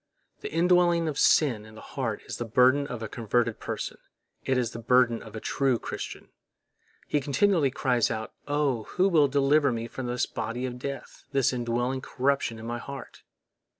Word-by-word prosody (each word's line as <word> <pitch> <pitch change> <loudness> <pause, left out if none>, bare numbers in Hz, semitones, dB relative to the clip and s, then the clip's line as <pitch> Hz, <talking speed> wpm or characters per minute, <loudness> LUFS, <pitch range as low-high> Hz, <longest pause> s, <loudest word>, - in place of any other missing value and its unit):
The - - -6
indwelling 175 0 +3
of 150 -3 -2
sin 125 -9 +4
in 110 0 -14
the - - -10
heart 115 -6 -4
is - - -6
the - - -3
burden 130 +5 +4
of 120 -5 -6
a - - -3
converted 115 0 0
person; - - -5 0.4
it 130 - +1
is 120 -3 0
the 115 - -7
burden 120 0 +3
of 110 -1 -11
a - - -4
true 135 +1 +1
Christian. - - -7 0.8
He 145 - +1
continually 150 +2 +2
cries 125 -3 +1
out: 110 0 -4
"Oh! 145 -6 0
who 185 +1 +4
will 160 -6 +4
deliver 140 +1 +3
me 115 0 -3
from 125 +1 -6
this 120 0 0
body 115 +3 -4
of 125 -1 -5
death, 140 +2 -7
this 135 -2 +2
indwelling 120 +2 -1
corruption 135 -3 0
in 110 - -9
my 120 +1 -3
heart?" 135 0 -9
125 Hz, 185 wpm, -27 LUFS, 115-140 Hz, 0.8 s, sin